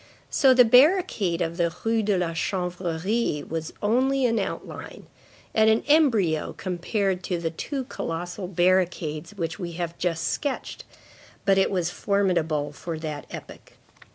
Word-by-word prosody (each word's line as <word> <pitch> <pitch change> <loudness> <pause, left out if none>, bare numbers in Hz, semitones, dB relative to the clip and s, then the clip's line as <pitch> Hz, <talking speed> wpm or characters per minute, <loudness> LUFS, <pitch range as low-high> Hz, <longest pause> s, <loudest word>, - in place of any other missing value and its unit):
So 265 -3 +5
the 250 -1 +7
barricade 250 - +4
of 170 0 -4
the 170 -2 +1
Rue 225 0 +2
de 205 -2 +1
la 175 -2 -1
Chanvrerie 180 +1 -2
was 160 0 -4
only 260 +5 +2
an 230 -2 +2
outline, 195 - -6 0.5
and 220 0 +5
an 220 +1 +3
embryo 230 - +3
compared 185 +1 -2
to 180 - -1
the 165 -1 -2
two 270 - -4
colossal 175 -5 -5
barricades 175 -2 0
which 165 -1 -4
we 175 -2 -5
have 170 0 -4
just 165 -2 -1
sketched; 285 -3 -3 0.6
but 195 -1 +4
it 195 - +3
was 180 -3 -1
formidable 175 -8 0
for 165 +3 -5
that 155 -2 -6
epoch. - - -10
180 Hz, 145 wpm, -25 LUFS, 165-220 Hz, 0.6 s, the